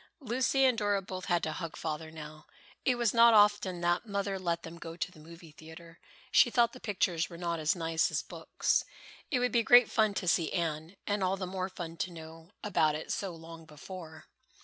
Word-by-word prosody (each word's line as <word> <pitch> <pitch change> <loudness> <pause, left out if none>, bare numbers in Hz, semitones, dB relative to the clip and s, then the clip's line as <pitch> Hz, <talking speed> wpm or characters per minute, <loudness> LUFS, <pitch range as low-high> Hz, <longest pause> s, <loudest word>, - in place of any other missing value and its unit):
Lucy 260 +1 +1
and 250 -3 +3
Dora 205 -1 +1
both 185 -1 -6
had 175 -1 +1
to 155 - -1
hug 165 0 -6
Father 160 0 -4
now. 155 -1 -11 0.4
It 255 - +3
was 235 -3 +1
not 230 -1 +7
often 205 -4 +3
that 175 0 +1
Mother 200 -1 -2
let 170 -2 -2
them 165 +1 -9
go 165 0 -8
to 180 - -3
the 160 - -17
movie 165 +1 -13
theatre. 160 +2 -13 0.3
She 240 - +6
thought 235 -1 +2
the 255 - -11
pictures 180 -6 -1
were 170 - -10
not 170 -1 -2
as 155 +2 +1
nice 165 -1 +1
as - - -2
books. - - -1 0.5
It 270 - +1
would 250 0 +1
be 235 - +3
great 245 +1 +6
fun 215 -2 +2
to 185 - -3
see 165 -2 +2
"Anne," 165 +1 -2
and 205 -1 -1
all 185 +1 +1
the 185 - -4
more 185 0 -3
fun 170 -3 -7
to 185 - -3
know 165 0 -11
about 155 -7 +2
it 155 - -5
so 190 -4 -3
long 165 0 -11
before. 160 +1 -10
175 Hz, 215 wpm, -31 LUFS, 165-205 Hz, 0.5 s, not